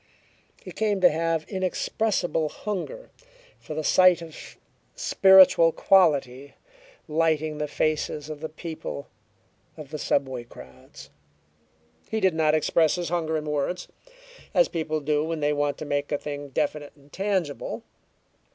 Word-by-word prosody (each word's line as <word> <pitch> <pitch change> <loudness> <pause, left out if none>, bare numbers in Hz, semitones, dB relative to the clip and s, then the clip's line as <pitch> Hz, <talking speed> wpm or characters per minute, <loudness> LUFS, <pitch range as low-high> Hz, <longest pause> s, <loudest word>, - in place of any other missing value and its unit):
He - - -9
came 210 -2 0
to 180 - +6
have 165 0 -1
an - - -25
inexpressible 185 -3 -1
hunger 210 - -6 0.5
for 155 - -8
the 155 - -3
sight 180 +1 +5
of 160 -2 -11 0.4
spiritual 190 -3 +6
quality 140 -8 +2 0.5
lighting 155 -1 0
the 150 - -1
faces 150 0 -1
of 155 -1 -7
the 160 +1 -5
people 155 -3 -7 0.7
of 150 -3 -10
the 155 - -5
subway 130 -3 -1
crowds. 65 - -14 1.0
He 220 - -1
did 190 -4 +2
not 155 -1 +2
express 155 0 +2
his 175 -1 -3
hunger 160 -2 -1
in 155 - -5
words, 150 +4 -2 0.7
as - - +5
people 155 -1 -2
do 150 +1 0
when 165 0 -3
they 150 0 +1
want 145 -1 -1
to 155 - -6
make 145 0 -2
a 145 - +1
thing 145 0 -6
definite 145 +1 -2
and 145 0 -23
tangible. 190 -7 -2
155 Hz, 140 wpm, -25 LUFS, 145-175 Hz, 1.0 s, to